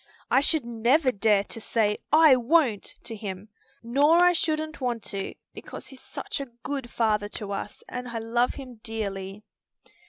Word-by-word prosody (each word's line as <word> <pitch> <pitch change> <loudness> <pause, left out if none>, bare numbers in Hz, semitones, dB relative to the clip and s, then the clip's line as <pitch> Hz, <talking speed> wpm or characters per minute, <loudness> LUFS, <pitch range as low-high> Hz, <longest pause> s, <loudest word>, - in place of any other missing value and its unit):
I - - +6
should 290 -1 +2
never 240 +5 +2
dare 205 -2 +3
to 225 - -7
say 210 -2 +1
'I 310 -3 +7
won't' 245 -4 +2
to 230 - -5
him. 200 -1 -7 0.3
Nor 290 +8 +4
I 355 0 +6
shouldn't 310 -2 -1
want 240 -4 -1
to, 195 -1 -4 0.2
because - - -9
he's 265 -1 -11
such - - -5
a 275 - -5 0.2
good 275 -4 -4
father 215 -3 +1
to 205 -2 -6
us, 200 - -5
and 250 0 -5
I 235 - -4
love 235 +2 0
him 255 -5 -10
dearly." 200 -3 -5
235 Hz, 165 wpm, -26 LUFS, 210-275 Hz, 0.3 s, I